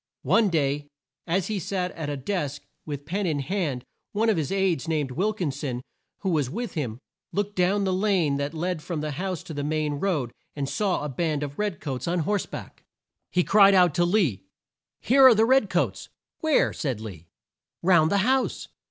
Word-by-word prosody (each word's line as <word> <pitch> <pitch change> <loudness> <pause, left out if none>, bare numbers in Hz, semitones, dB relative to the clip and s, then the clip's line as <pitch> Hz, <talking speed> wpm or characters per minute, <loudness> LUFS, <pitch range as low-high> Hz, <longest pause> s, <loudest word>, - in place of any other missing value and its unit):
One 225 -3 +4
day 145 -3 0 0.4
as 180 +2 +1
he 215 -2 -2
sat 180 +1 -2
at 155 -3 -5
a 145 - -2
desk 145 -1 -3 0.2
with 145 -1 -5
pen 190 +4 -1
in 155 -3 0
hand, 140 -4 -2 0.3
one 220 +2 +2
of 205 - 0
his 155 0 -1
aides 190 -7 +1
named 150 -5 -1
Wil 190 +11 +1
kin 180 -9 -2
son, 130 -3 -4 0.4
who 190 - 0
was 150 -6 +1
with 235 - -4
him, 125 -9 -3 0.3
looked 205 0 -2
down 190 +3 +2
the 190 -1 +1
lane 185 -7 +2
that 140 +3 -3
led 175 0 -2
from 155 0 -4
the 150 0 -3
house 180 +3 -3
to 160 - -8
the 145 -1 -3
main 150 -1 -1
road 150 -11 -1 0.2
and 140 -2 -2
saw 180 +5 0
a - - -2
band 150 +1 -1
of 145 -1 -6
red 210 -4 -1
coats 130 -3 -4
on 175 0 +1
horse 205 +5 0
back. - - -9 0.5
He 180 - +2
cried 200 0 +6
out 180 -4 +5
to 175 - +2
Lee 175 - +2 0.6
"Here 270 +3 +5
are 245 - +7
the 220 +1 +4
red 255 -4 +4
coats!" - - -1 0.3
"Where?" 315 -3 +2
said 130 -8 -2
Lee. 95 -7 -9 0.6
"Round 170 -3 +5
the 200 - +3
house!" 265 +1 0
170 Hz, 200 wpm, -26 LUFS, 145-195 Hz, 0.6 s, are